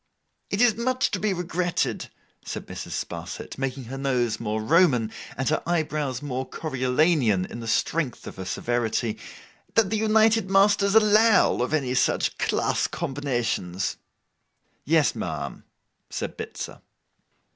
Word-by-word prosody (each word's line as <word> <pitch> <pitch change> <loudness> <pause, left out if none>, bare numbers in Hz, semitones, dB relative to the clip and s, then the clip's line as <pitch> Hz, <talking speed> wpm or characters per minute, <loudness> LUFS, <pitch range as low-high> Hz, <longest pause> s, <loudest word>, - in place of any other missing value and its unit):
'It 200 - -1
is 240 -3 +5
much 255 +3 0
to 200 - -1
be 210 +2 +1
regretted,' 180 -1 -1 0.3
said - - -6
Mrs. - - -7
Sparsit, - - -7
making 135 0 -3
her 135 +3 -7
nose 125 -5 0
more 110 -1 -2
Roman 125 -3 +3 0.3
and 135 - -1
her 155 - +1
eyebrows 150 -6 -1
more 130 -2 -2
Coriolanian 130 - +1
in 115 - -8
the 115 - -7
strength 150 +4 0
of - - -9
her 95 - -6
severity, 115 0 -1 0.6
'that 220 -3 +3
the 220 - +1
united 220 -1 +3
masters 200 +1 +4
allow 215 0 +5
of 125 - -1
any 135 -5 0
such 130 - +1
class - - +1
combinations.' 120 - -2 0.9
'Yes, 155 0 +3
ma'am,' - - -5 0.4
said - - -4
Bitzer. - - -7
145 Hz, 135 wpm, -25 LUFS, 125-195 Hz, 0.9 s, is